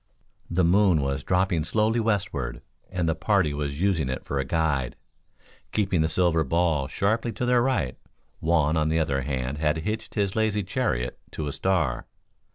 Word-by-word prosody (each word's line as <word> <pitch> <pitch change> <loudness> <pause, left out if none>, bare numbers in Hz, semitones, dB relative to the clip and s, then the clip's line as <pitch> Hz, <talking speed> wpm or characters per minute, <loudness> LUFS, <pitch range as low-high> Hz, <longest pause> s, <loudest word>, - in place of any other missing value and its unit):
The 90 +1 +1
moon 90 -2 +4
was 70 0 -2
dropping 90 -3 +1
slowly 110 +7 +1
westward, 100 - -1 0.3
and 90 -3 -1
the 80 - +2
party 90 -2 +1
was 70 +2 -3
using 85 -9 +1
it 65 - -4
for 70 - -2
a - - +1
guide, 70 -4 0 0.8
keeping 95 -5 +1
the 80 - +1
silver 85 -1 +2
ball 80 -2 +1
sharply 110 - 0
to 125 - -2
their 125 0 +4
right. 120 - 0 0.4
Juan 80 -1 +2
on 80 0 +1
the 80 - +1
other 70 -4 +1
hand 65 +1 -3
had 75 0 +1
hitched 110 +1 -4
his 100 -3 0
lazy 110 -2 +1
chariot 60 -9 -2
to 80 - -3
a 70 - -3
star. 90 -9 0
85 Hz, 170 wpm, -26 LUFS, 75-100 Hz, 0.8 s, moon